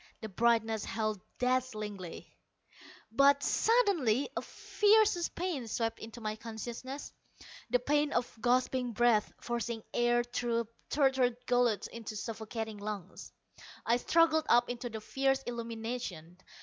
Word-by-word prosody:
The 220 Hz, -, -5 dB
brightness 225 Hz, 0 st, +2 dB
held 215 Hz, -3 st, -2 dB, 0.2 s
dazzlingly. 215 Hz, -8 st, -2 dB, 0.8 s
But 280 Hz, +4 st, +5 dB
suddenly 345 Hz, -, +2 dB
a -, -, -1 dB
fiercer 420 Hz, -4 st, +2 dB
pain 335 Hz, -9 st, -2 dB
swept 225 Hz, 0 st, -2 dB
into 225 Hz, +2 st, -9 dB
my 215 Hz, -1 st, -3 dB
consciousness 235 Hz, +5 st, -7 dB, 0.6 s
the 250 Hz, -, +4 dB
pain 290 Hz, +4 st, +1 dB
of 245 Hz, 0 st, -1 dB
gasping 250 Hz, 0 st, +1 dB
breath 230 Hz, -1 st, +3 dB
forcing 235 Hz, -1 st, -3 dB
air 240 Hz, 0 st, +3 dB
through 240 Hz, -1 st, -1 dB
a 230 Hz, -, -7 dB, 0.2 s
tortured 265 Hz, -4 st, +2 dB
gullet 245 Hz, -4 st, +2 dB
into 225 Hz, -2 st, -7 dB
suffocating 220 Hz, 0 st, -5 dB
lungs. 205 Hz, -3 st, -6 dB, 0.5 s
I 235 Hz, +1 st, +3 dB
struggled 315 Hz, +3 st, +3 dB
up 240 Hz, 0 st, +4 dB
into 245 Hz, 0 st, -5 dB
the 220 Hz, -1 st, -6 dB
fierce 270 Hz, +3 st, 0 dB
illumination. 230 Hz, -8 st, -5 dB
240 Hz, 125 wpm, -32 LUFS, 220-260 Hz, 0.8 s, But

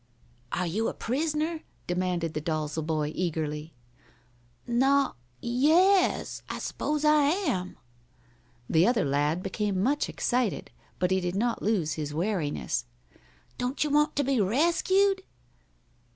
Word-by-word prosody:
"Are 180 Hz, -, -1 dB
you 210 Hz, +7 st, -1 dB
a -, -, -3 dB
prisoner?" 310 Hz, +5 st, -1 dB, 0.2 s
demanded 175 Hz, -2 st, -1 dB
the 155 Hz, -, -3 dB
Dalzel 155 Hz, -1 st, -2 dB
boy, 155 Hz, -1 st, -1 dB
eagerly. 155 Hz, -3 st, -3 dB, 0.9 s
"No 270 Hz, +3 st, +3 dB
o -, -, -25 dB, 0.3 s
yes 325 Hz, +11 st, +3 dB
I -, -, -3 dB
s'pose 300 Hz, 0 st, -2 dB
I 300 Hz, -1 st, +5 dB
am." 285 Hz, -, -1 dB, 0.9 s
The 165 Hz, +4 st, +4 dB
other 235 Hz, -5 st, +2 dB
lad 145 Hz, +5 st, 0 dB
became 195 Hz, -1 st, -1 dB
much 285 Hz, +5 st, +1 dB
excited, 245 Hz, -4 st, -1 dB, 0.3 s
but 180 Hz, 0 st, 0 dB
he 190 Hz, -, +3 dB
did 180 Hz, 0 st, -2 dB
not 230 Hz, +3 st, 0 dB
lose 190 Hz, -8 st, +1 dB
his 150 Hz, -1 st, -4 dB
wariness. 170 Hz, -, -1 dB, 0.7 s
"Don't 250 Hz, +4 st, 0 dB
you 300 Hz, -, -2 dB
want 300 Hz, +1 st, +3 dB
to 285 Hz, -, +2 dB
be 265 Hz, -4 st, +2 dB
rescued?" 345 Hz, -, +2 dB
215 Hz, 130 wpm, -28 LUFS, -, 0.9 s, I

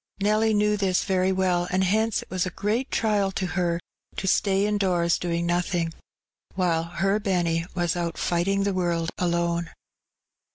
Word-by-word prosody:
Nelly 215 Hz, +2 st, +2 dB
knew 210 Hz, 0 st, +2 dB
this 190 Hz, -2 st, +1 dB
very 185 Hz, -1 st, +1 dB
well, 180 Hz, -2 st, +1 dB
and 185 Hz, +1 st, +1 dB
hence 220 Hz, +4 st, +1 dB
it -, -, -23 dB
was 185 Hz, 0 st, 0 dB
a -, -, -1 dB
great 220 Hz, +8 st, -1 dB
trial 205 Hz, -3 st, +1 dB
to 190 Hz, -, -2 dB
her 175 Hz, -2 st, 0 dB, 0.4 s
to -, -, -4 dB
stay 195 Hz, +1 st, +2 dB
indoors 185 Hz, -5 st, +1 dB
doing 170 Hz, -1 st, -1 dB
nothing, 175 Hz, -1 st, 0 dB, 0.6 s
while 175 Hz, -3 st, +1 dB
her 195 Hz, +4 st, 0 dB
Benny 175 Hz, -5 st, 0 dB
was 175 Hz, -2 st, 0 dB
out 170 Hz, -1 st, -3 dB
fighting 195 Hz, +3 st, +1 dB
the 200 Hz, 0 st, 0 dB
world 170 Hz, -2 st, -1 dB
alone. 170 Hz, -1 st, 0 dB
185 Hz, 160 wpm, -25 LUFS, 170-200 Hz, 0.6 s, Nelly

